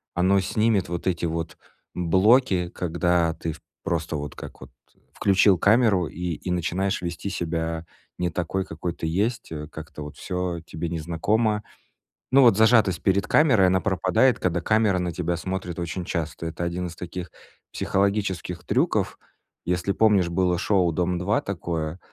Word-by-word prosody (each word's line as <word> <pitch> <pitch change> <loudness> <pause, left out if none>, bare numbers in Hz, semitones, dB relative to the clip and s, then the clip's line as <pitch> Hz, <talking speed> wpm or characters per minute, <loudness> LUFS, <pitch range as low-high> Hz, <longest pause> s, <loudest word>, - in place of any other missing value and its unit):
оно 95 +3 +3
снимет 105 0 +1
вот 85 0 -4
эти 85 -2 0
вот 80 0 -4 0.4
блоки, 95 +2 +3
когда 85 -1 +1
ты 80 0 -4
в 75 - -14 0.2
просто 80 -1 -2
вот 75 0 -5
как - - -10
вот - - -11 0.4
включил 95 -1 +4
камеру 100 -3 +3
и 90 +2 -4
и 90 - -5
начинаешь 90 +3 -1
вести 85 +2 -4
себя 80 -2 -3 0.3
не 90 - 0
такой, 90 +3 -2
какой 85 0 -4
ты - - -6
есть, 110 +7 -1
э, 75 -1 -5
как-то 75 -1 -9
вот 75 - -9
всё 90 -2 -3
тебе 80 +2 -5
незнакомо. 105 +7 0 0.7
Ну, 135 +2 +6
вот 120 -6 +6
зажатость 110 -6 +4
перед 95 -1 +2
камерой, 120 -12 +4
она 95 0 +2
пропадает, 95 +6 +2
когда 90 -1 0
камера 110 +1 +2
на 90 -1 -1
тебя 85 0 -2
смотрит 95 -1 -4
очень 85 +1 -3
часто. 85 -1 -4
Это 80 +1 -4
один 90 +1 -2
из 85 - -10
таких 90 0 -6 0.4
психологических 95 -3 -1
трюков. - - 0 0.5
Если 90 +2 0
помнишь, 100 -4 +3
было 90 0 +1
шоу 90 -3 +2
"Дом-2" 90 +4 0
такое, 85 -3 -3
90 Hz, 155 wpm, -24 LUFS, 85-100 Hz, 0.7 s, Ну